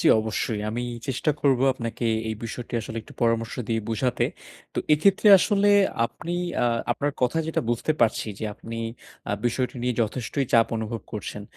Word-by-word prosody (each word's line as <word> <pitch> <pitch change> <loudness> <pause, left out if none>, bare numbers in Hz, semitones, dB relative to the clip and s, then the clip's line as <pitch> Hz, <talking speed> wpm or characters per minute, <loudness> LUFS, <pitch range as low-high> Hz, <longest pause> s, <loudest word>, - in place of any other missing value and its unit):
জি, - - +1
অবশ্যই 110 0 -2
আমি 120 +3 -2 0.2
চেষ্টা 135 +3 0
করব 135 -3 +3
আপনাকে 115 -1 -4 0.2
এই 110 - -1
বিষয়টি 120 +1 -6
আসলে 110 +1 -7
একটু - - -15
পরামর্শ 115 -1 +1
দিয়ে 115 -1 +1
বোঝাতে। 120 +2 0 0.5
তো - - -2
এক্ষেত্রে 195 +7 +4
আসলে 205 +2 +3 0.4
আপনি 165 +7 -7 0.3
আ - - +4 0.3
আপনার 145 0 -1
কথা 125 +6 +2
যেটা 160 - 0
বুঝতে 120 +6 +1
পারছি 115 - +2
যে - - -4
আপনি 115 +2 -8 0.5
আ - - +1
বিষয়টি 125 +2 0
নিয়ে 125 0 0
যথেষ্টই 125 +5 -2
চাপ 115 -1 +6
অনুভব 110 +1 -3
করছেন। 105 -1 -5
120 Hz, 165 wpm, -25 LUFS, 115-135 Hz, 0.5 s, চাপ